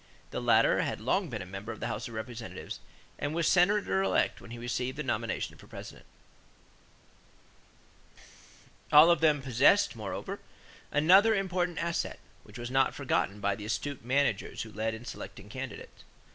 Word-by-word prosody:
The - - -3
latter - - +4
had - - -2
long 190 -3 0
been 110 -6 -4
a - - -10
member 95 +5 -7
of 110 - -8
the - - -3
House 120 - -3
of 115 - -9
Representatives 115 +1 -6 0.4
and 150 +1 -2
was 170 -1 +1
Senator 180 - +3
elect 95 -1 +1
when - - -12
he 120 - -7
received 125 +2 -3
the - - -2
nomination - - -2
for - - -15
President. - - -10 2.8
All 155 +3 +9
of 170 - +2
them 150 -3 +3
possessed, 135 - +4
moreover, 105 -3 -5 0.5
another 190 +9 +6
important 180 -3 -1
asset, 170 0 -2 0.2
which - - -13
was 120 +1 -6
not 135 0 +2
forgotten 105 -7 0
by 100 0 +1
the 105 - -8
astute 130 +5 -3
managers 130 -4 0
who 110 - -10
led 110 +1 -2
in 115 +2 -10
selecting 105 -5 -8
candidates. 130 -1 -8
130 Hz, 160 wpm, -30 LUFS, 110-165 Hz, 2.8 s, All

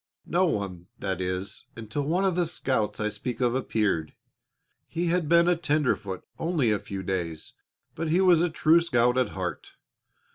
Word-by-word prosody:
No 180 +2 +2
one, 95 - -3
that 95 -1 -3
is, 90 +1 -4
until 115 +5 -4
one 170 +7 +1
of 190 - +2
the 175 -1 +1
scouts 130 -9 -1
I 105 - 0
speak 115 +3 -5
of 120 -2 +2
appeared. 105 - 0 0.7
He 170 +1 -1
had 170 -3 0
been 170 0 +5
a 180 - +4
tenderfoot 145 - 0 0.2
only 160 -9 +1
a 105 - +1
few 95 -1 -6
days, 85 -4 -3 0.4
but 165 0 -3
he 170 +4 +3
was 180 -4 +5
a 175 - +2
true 160 +1 +4
scout 125 -7 +2
at 130 -1 +2
heart. 90 -2 -4
125 Hz, 175 wpm, -27 LUFS, -, 0.7 s, been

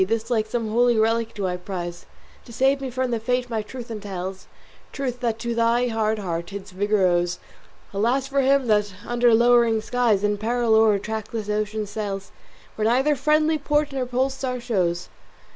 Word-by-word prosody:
This 225 +4 -2
like 220 -2 +1
some 225 -1 -2
holy 240 +1 +3
relic 225 +1 +1
do 200 -3 -2
I 180 -1 -1
prize 175 -2 -6 0.4
To - - -12
save 270 +4 +2
me 265 - -3
from 255 0 -2
the 230 - 0
fate 250 +2 -1
my 220 -1 0
truth 240 +2 -9
entails, 190 -3 -6 0.4
Truth 255 -3 -3
that 230 -3 -1
to 235 +1 -3
thy 235 +1 +2
hard 220 -1 0
heart 170 -3 -4
its 200 -1 -7
vigour 205 +1 +1
owes. 175 0 +1 0.6
Alas 240 +7 +1
for 275 0 +1
him 270 0 +3
that 210 -3 +1
under 240 0 +3
lowering 235 -1 +4
skies, 220 -3 +1
In 205 0 +1
peril 235 +1 +1
o'er 220 -1 +5
a - - -1
trackless 220 +1 -5
ocean 210 0 -1
sails, 200 -2 -5 0.5
Where 215 0 +1
neither 265 +6 +3
friendly 305 +3 +2
port 295 0 +1
nor 265 -2 -2
pole 255 +2 0
star 260 -2 -3
shows." 180 -7 -1
225 Hz, 185 wpm, -23 LUFS, 205-250 Hz, 0.6 s, o'er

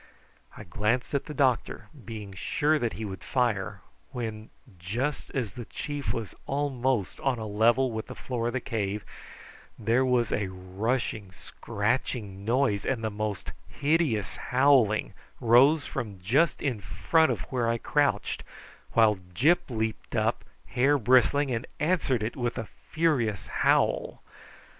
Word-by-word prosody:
I - - -8
glanced 110 +9 -1
at 140 - 0
the 150 - -6
doctor, 130 -3 +1
being 105 -3 -7
sure 150 - +1
that 120 -3 -1
he 110 - -5
would 95 -2 -7
fire, 120 -7 0 0.3
when, 110 -2 -5 0.3
just 120 +12 -2
as 115 -8 -2
the 120 0 -7
chief 145 +6 -4
was 115 -3 -4
almost 130 -6 -1
on 135 -3 0
a 110 - -5
level 115 +5 +3
with 110 -1 -4
the - - -8
floor 120 -2 -3
of 120 - -2
the 130 - -1
cave, 105 -2 -3 0.7
there 115 +4 +2
was 125 -4 +2
a 100 -2 0
rushing, 95 +3 -3
scratching 105 -1 -3
noise, 115 -3 +1
and 125 -4 -1
the 110 - -1
most 105 -2 -3 0.2
hideous 145 - 0
howling 125 -6 +3 0.3
rose 130 +6 +5
from 110 -7 -5
just 135 - +2
in 130 -7 0
front 160 - +2
of 110 -6 -2
where 120 -3 +1
I 115 - +1
crouched, 140 -4 0 0.5
while 110 -3 +5 0.2
Gyp 170 - +3
leaped 110 -2 -3
up, - - +1 0.3
with - - -19
hair 140 +4 +4
bristling, 130 +3 +4
and 115 0 -2
answered 150 - +1
it 110 - -3
with 120 -2 -2
a 115 - -4 0.2
furious 145 - +1
howl. - - +1
120 Hz, 150 wpm, -28 LUFS, 105-135 Hz, 0.7 s, rose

